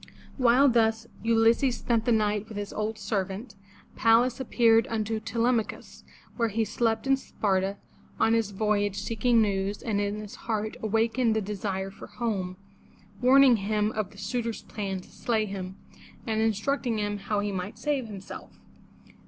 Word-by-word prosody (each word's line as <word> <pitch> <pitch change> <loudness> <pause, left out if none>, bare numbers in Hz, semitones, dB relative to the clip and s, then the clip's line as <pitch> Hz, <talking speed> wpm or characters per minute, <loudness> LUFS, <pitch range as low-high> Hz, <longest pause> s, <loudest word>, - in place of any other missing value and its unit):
While 255 +3 +5
thus 225 -2 +2 0.2
Ulysses 230 +2 +3
spent 230 -2 0
the 240 - +2
night 210 -1 +1
with 215 - -7
his 205 0 -5
old 215 +1 -2
servant, 200 +1 -3 0.4
Pallas 235 +2 +3
appeared 230 -3 +3
unto 220 0 -2
Te 225 +2 -9
lem'a 235 -1 +3
chus, - - -11 0.3
where 230 -2 +1
he 220 +2 0
slept 225 +1 0
in 270 0 +4
Sparta 195 -6 -1 0.4
on 225 - +4
his 225 -3 +1
voyage 205 -1 0
seeking 230 +3 +2
news, 200 0 -1
and 210 -3 0
in 205 0 -1
his 210 -1 -8 0.2
heart 215 0 -1
awakened 225 +2 +1
the - - +2
desire 195 -2 -3
for - - -11
home, 195 -6 -3 0.6
warning 260 -1 +6
him 210 +1 0
of 215 -3 -3
the 200 - -17
suitors' 230 +3 -3
plan 195 -3 -4
to - - -18
slay 220 -3 0
him, 190 -1 -6 0.5
and 220 -2 0
instructing 225 +2 0
him 205 -1 -2
how 205 +1 -1
he 205 0 -1
might 190 +2 -5
save 285 -5 -1
himself. 195 -3 -9
220 Hz, 160 wpm, -27 LUFS, 205-230 Hz, 0.6 s, warning